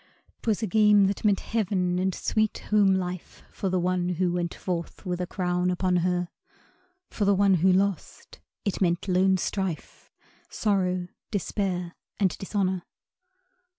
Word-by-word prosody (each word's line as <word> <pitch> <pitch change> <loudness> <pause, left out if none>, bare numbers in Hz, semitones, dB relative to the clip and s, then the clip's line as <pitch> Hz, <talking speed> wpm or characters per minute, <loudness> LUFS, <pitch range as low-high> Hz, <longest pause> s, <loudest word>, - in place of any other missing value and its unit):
'Twas 225 0 0
a - - +3
game 210 0 +5
that 195 0 -2
meant 205 -3 +3
heaven 185 -5 0
and 190 0 0
sweet 215 -1 0
home 200 -2 +5
life 180 -1 -5
For 195 - -3
the 185 0 +1
one 180 0 0
who 180 0 0
went 175 -1 -1
forth 175 +1 -5
with 180 -1 -2
a 180 - -2
crown 180 -1 0
upon 180 0 +1
her; 175 0 0 0.8
For 210 - -2
the 200 0 +4
one 195 0 +4
who 190 +1 +5
lost 195 0 -1 0.3
it 200 - -2
meant 175 +1 +1
lone 190 +1 +3
strife, 185 -2 -4 0.4
Sorrow, 185 -4 0 0.2
despair 185 -3 -2 0.3
and 195 -3 +2
dishonor. 190 -2 -1
185 Hz, 150 wpm, -26 LUFS, 180-200 Hz, 0.8 s, game